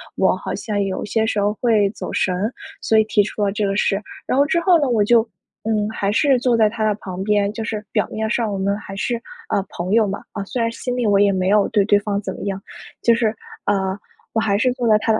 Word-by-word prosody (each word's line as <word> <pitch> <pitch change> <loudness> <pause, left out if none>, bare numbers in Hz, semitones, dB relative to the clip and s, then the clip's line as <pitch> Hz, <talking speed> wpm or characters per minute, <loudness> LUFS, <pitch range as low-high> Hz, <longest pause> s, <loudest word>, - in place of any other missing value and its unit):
我 - - +3
好 - - -5
像 205 -2 -2
有 195 -1 -2
些 220 +2 0
时 215 - 0
候 205 +1 +1
会 220 -5 +3
走 215 - -6
神 185 - +1
儿， 205 +7 -2 0.3
所 220 - +2
以 220 - +6
提 210 -1 +3
出 210 +1 -3
了 200 - +1
这 210 +1 -1
个 195 0 0
事。 200 0 +1 0.2
然 260 - 0
后 280 - +5
之 340 +3 +1
后 345 -1 +5
呢， 285 - +1
我 225 -4 +3
就 230 +2 +4 0.4
嗯 215 -1 0
还 200 -2 -1
是 265 +3 +3
坐 245 -1 +2
在 220 -2 +4
他 220 0 -2
的 210 - +2
旁 185 -1 -6
边， 205 0 +2
就 225 - -6
是 215 -1 -4
表 - - +1
面 220 0 -2
上 230 -2 0
我 200 - -2
们 200 +1 0
还 195 -2 -9
是 235 +4 -1 0.3
呃 200 - +1
朋 175 +2 -4
友 225 -1 +4
嘛， 195 +1 -4 0.2
虽 240 +4 -3
然 230 0 +1
心 245 +2 -4
里 245 -1 -1
我 200 -2 +4
也 200 0 +4
没 185 0 0
有 210 0 +4
对 205 - +3
对 205 0 +4
方 205 0 -2
怎 - - -4
么 - - -8
样 195 -1 -3 0.4
就 235 - +5
是 225 -1 +1 0.3
呃 190 -1 0 0.4
我 225 - +2
还 200 -2 +1
是 250 +4 +2
坐 245 -2 -2
在 215 - +6
他 220 - 0
的 220 - +2
210 Hz, 285 characters per minute, -20 LUFS, 200-230 Hz, 0.4 s, 以